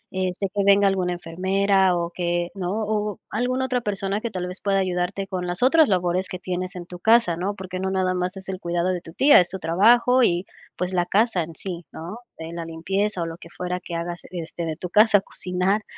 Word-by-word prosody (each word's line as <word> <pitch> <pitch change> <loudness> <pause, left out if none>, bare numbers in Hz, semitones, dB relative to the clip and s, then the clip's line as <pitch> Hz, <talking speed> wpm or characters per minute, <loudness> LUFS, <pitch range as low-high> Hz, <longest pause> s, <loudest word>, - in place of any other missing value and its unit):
eh, 185 -1 0
sé 195 - -2
que 205 - +1
venga 200 0 +5
alguna 185 -2 0
enfermera 190 +2 +1
o 170 0 -2
que, 175 -1 -1
¿no?, 185 -3 -3 0.2
o 210 -1 -2
alguna 250 +4 0
otra 250 -1 0
persona 200 -1 -2
que 235 - -2
tal 185 -2 -3
vez, 180 +1 -7
pueda 200 -1 +1
ayudarte 185 +1 -1
con 185 -2 -3
las 175 +5 -1
otras 310 +2 +5
labores 180 0 +1
que 185 - -5
tienes 185 +1 -4
en 175 -1 -7
tu 180 0 -10
casa, 220 -3 +4
¿no?, 195 +4 -2
porque 185 -2 -6
no 190 0 -1
nada 185 -1 +1
más 180 +1 -2
es 190 - -9
el 190 -1 -4
cuidado 175 0 -1
de 180 - -4
tu 165 - -12
tía, 285 - +7
es 175 - -2
tu 190 - -4
trabajo 235 +9 +4
y, 175 -3 +2 0.3
pues, 180 +1 -2
la 175 -1 +2
casa 215 -2 +2
en 165 0 -10
sí, 175 -2 -6
¿no?, 175 +8 -7 0.2
en 165 +1 -7
la 170 - -4
limpieza 185 +4 -2
o - - -2
lo 165 0 -6
que 170 - -13
fuera 180 +1 -4
que 175 - -7
hagas, 170 +1 -4
este, 170 -1 -5
de 160 -1 -3
tu 180 - -6
casa, 210 -1 +6
cocinar. 185 +3 -1
185 Hz, 235 wpm, -23 LUFS, 175-200 Hz, 0.3 s, tía